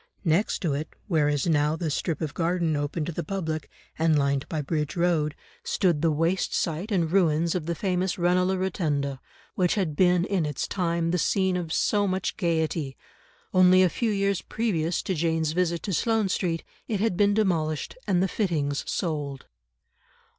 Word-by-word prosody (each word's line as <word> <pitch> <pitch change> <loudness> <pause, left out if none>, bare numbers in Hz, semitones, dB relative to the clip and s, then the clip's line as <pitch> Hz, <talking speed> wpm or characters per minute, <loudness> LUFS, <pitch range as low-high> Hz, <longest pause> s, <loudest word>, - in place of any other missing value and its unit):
Next 175 +6 +1
to 160 -5 +1
it, 150 +3 -4
where 155 -6 +2
is 145 -2 0
now 150 -2 +2
the 160 -2 -2
strip 160 +2 -2
of 155 -3 -3
garden 170 -2 0
open 145 +2 -2
to 175 - -3
the 170 +1 -4
public, 160 -7 -3 0.3
and 160 -1 +3
lined 140 -1 0
by 160 - -2
Bridge 150 0 -2
Road, 170 -4 +1 0.3
stood 175 -6 +1
the 165 - +3
waste 165 +5 0
site 170 +6 -2
and 170 -5 +1
ruins 170 -3 +2
of 170 -4 -3
the 170 - -1
famous 185 0 -1
Ranelagh 180 +2 +2
Rotunda, 145 -7 -1 0.3
which 180 -2 +1
had 180 -8 -1
been 180 0 +3
in 195 -4 0
its 150 -3 -2
time 170 -3 0
the 180 - +1
scene 190 +2 +1
of 175 -3 -3
so 205 +3 +2
much 190 0 -1
gaiety; 160 -6 -1 0.6
only 185 0 +6
a 185 - +4
few 230 +6 -1
years 200 -2 0
previous 175 -7 -1
to 190 - -1
Jane's 160 -1 0
visit 170 0 0
to 195 - -2
Sloane 220 +2 +1
Street 170 -3 -1 0.2
it 210 -3 -1
had 220 -3 +1
been 205 +1 +3
demolished 165 -8 0
and 185 -2 +2
the - - +2
fittings 155 -9 -1
sold. 145 -6 -3
170 Hz, 180 wpm, -26 LUFS, 155-185 Hz, 0.6 s, only